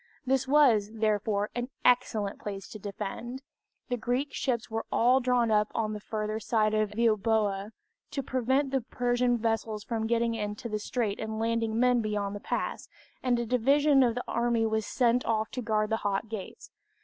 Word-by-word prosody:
This 265 0 +1
was, 260 -8 +4
therefore, 210 -1 0
an 245 +1 -3 0.2
excellent 220 -5 +2
place 200 -2 -6
to 215 - -9
defend. 220 +6 -6 0.5
The 245 - 0
Greek 250 +4 -1
ships 240 -3 -1
were 225 0 -4
all 250 +3 +4
drawn 245 -2 +2
up 210 0 +3
on 215 -1 0
the 210 - -5
further 215 0 -3
side 215 -1 +1
of 215 -1 0
Euboea 215 -3 +1 0.4
to 275 - -3
prevent 260 +2 0
the 270 -1 +1
Persian 245 +1 +1
vessels 225 -2 -1
from 220 -1 -2
getting 235 0 +1
into 210 +1 -4
the 215 -2 -2
strait 210 -2 -2
and 220 0 -4
landing 225 0 0
men 250 -1 +4
beyond 205 -2 -2
the - - -5
pass, - - -3 0.3
and 250 -2 +2
a 235 - -1
division 275 +4 +4
of 240 -3 +3
the 245 - -3
army 235 -1 +1
was 220 -1 -1
sent 245 -1 +2
off 220 -1 0
to 250 - -4
guard 215 -1 0
the 220 - +2
Hot 205 0 -1
Gates. 215 -4 -8
225 Hz, 180 wpm, -29 LUFS, 215-245 Hz, 0.5 s, was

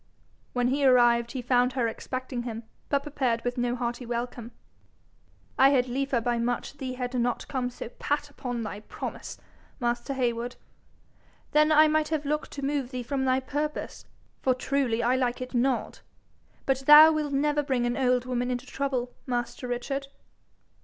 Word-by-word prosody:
When 245 0 +1
he 280 +2 0
arrived, 240 -2 +4
he 255 -2 -4
found 250 +1 +2
her 250 -3 +1
expecting 255 +2 -4
him, 230 -1 -5 0.3
but 280 -1 +1
prepared 260 -6 -1
with 245 0 -1
no 245 -1 0
hearty 240 0 -3
welcome. 240 0 -4 1.1
'I 270 +1 +8
had 255 -3 +3
liefer 270 0 0
by 235 +1 0
much 245 +4 -2
thee 260 -2 -4
had 250 0 -4
not 245 -1 -1
come 255 -2 -2
so 245 - -7
pat 290 +5 -2
upon 245 -5 -5
thy 210 -1 -5
promise, 210 - -7 0.4
master 240 +2 -1
Heywood. 240 -1 -1 1.0
Then 305 +1 +4
I 310 0 +7
might 310 0 +2
have 310 -2 -2
looked 300 +1 -1
to 280 -1 -4
move 280 -3 -1
thee 255 -2 -4
from 265 +2 -1
thy 260 0 +2
purpose, 295 +3 -4 0.4
for 255 -1 +2
truly 255 -3 0
I 245 +2 +3
like 250 -1 0
it 255 +1 -6
not. 250 +1 0 0.6
But 270 -1 +1
thou 305 +2 +10
will 305 -2 -1
never 295 +1 +1
bring 260 -4 0
an 240 0 0
old 250 -2 +2
woman 250 -1 -1
into 250 +1 -3
trouble, 260 -3 -2
master 245 0 -3
Richard?' 275 +3 -3
255 Hz, 170 wpm, -27 LUFS, 240-275 Hz, 1.1 s, thou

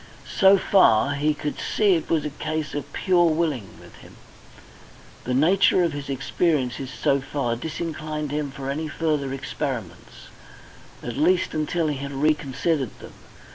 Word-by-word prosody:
So 195 0 +6
far, 140 - +4
he 150 +2 0
could 150 0 -4
see 205 -3 +2
it 165 - -1
was 155 -3 +1
a 150 - -3
case 155 +1 -4
of 145 - -5
pure 180 -3 +3
willing 155 - -2
with - - -15
him. - - -15 1.1
The 125 - -1
nature 180 +5 +4
of 170 -3 0
his 145 -1 -6
experiences 135 -2 -1
so 140 +1 +1
far 130 -4 -2
disinclined 155 +1 -4
him 150 -1 -2
for 135 0 -5
any 155 +3 -3
further 150 -3 -1
experiments, 130 - -6 0.7
at 120 0 -5
least 175 +5 +2
until 160 +2 -1
he 145 -2 -2
had 140 +1 -6
reconsidered 145 -1 0
them. - - -12
150 Hz, 150 wpm, -24 LUFS, 135-160 Hz, 1.1 s, So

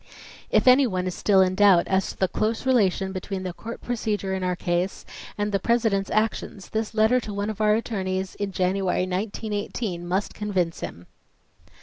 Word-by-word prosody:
If - - +2
any 255 +1 +7
one 185 -4 -2
is 185 - -2
still 195 0 +3
in 185 0 +3
doubt 190 -3 +5
as 190 0 +1
to - - -8
the 190 - +2
close 220 +6 -1
relation 195 -7 +2
between 190 0 -4
the 180 -1 -4
Court 230 +6 -8
procedure 215 -5 -2
in 190 -1 -2
our 180 0 0
case 175 +1 -2 0.3
and 205 0 -1
the 195 - +1
President's 220 -3 +1
actions, 215 -3 -1
this 220 0 -3
letter 220 +3 +4
to 215 -3 -7
one 205 +2 -1
of 215 - -7
our 210 0 +4
attorneys 190 -4 -2
in 200 -1 -4
January, 185 0 0
1918, 205 0 -3
must 190 +3 -1
convince 185 -5 -1
him. 85 - -7
195 Hz, 185 wpm, -25 LUFS, 185-220 Hz, 0.3 s, any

